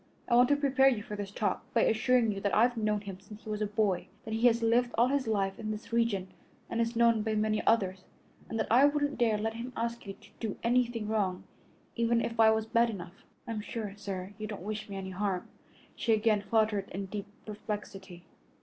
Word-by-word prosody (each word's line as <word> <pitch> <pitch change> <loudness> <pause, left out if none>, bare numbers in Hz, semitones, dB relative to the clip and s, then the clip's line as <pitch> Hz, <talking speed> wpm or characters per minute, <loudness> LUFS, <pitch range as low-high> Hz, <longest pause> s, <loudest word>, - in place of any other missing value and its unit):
I - - 0
want 245 +1 +6
to 290 - +5
prepare 275 -2 +3
you 240 -6 +2
for 210 - -6
this 205 -1 -5
talk 205 +1 -1
by 230 - +5
assuring 235 0 +3
you 195 -1 -5
that 200 - 0
I've 240 +3 +4
known 210 -2 0
him 195 -2 -8
since 210 +2 -13
he - - -9
was 210 0 -3
a 210 - +1
boy, 205 -3 0 0.2
that 220 - -4
he 225 +2 +4
has 230 -1 +2
lived 240 +2 +3
all 240 +2 +4
his 280 -2 0
life 195 -3 0
in 215 - -4
this 215 +2 -6
region 220 -5 +1 0.4
and 230 - 0
is 230 +1 -1
known 230 -1 +4
by 220 0 -1
many 215 0 +1
others, 190 -4 +2 0.4
and 225 - -3
that 220 - +1
I 250 +4 +6
wouldn't 290 -1 +1
dare 225 -3 +3
let 220 +1 -2
him 235 +3 -6
ask 235 -1 -3
you 195 - -4
to 205 +1 -19
do 220 -3 -3
anything 235 -2 +1
wrong, 200 -4 -1 0.5
even 235 0 +2
if 230 0 -3
I 220 -1 +8
was 220 0 +2
bad 230 +1 +3
enough." 190 -3 -8 0.2
"I'm 225 -2 -3
sure, 210 -2 -5
sir, 195 -2 -6
you 215 - -4
don't 205 -4 -7
wish 215 +1 -5
me 200 - -6
any 190 -1 -5
harm," 190 -1 -2 0.5
she 230 - +1
again 215 -1 +3
faltered 210 -1 +1
in 195 +2 -4
deep 200 +1 -6 0.2
perplexity. 200 -4 -7
215 Hz, 225 wpm, -30 LUFS, 205-230 Hz, 0.5 s, I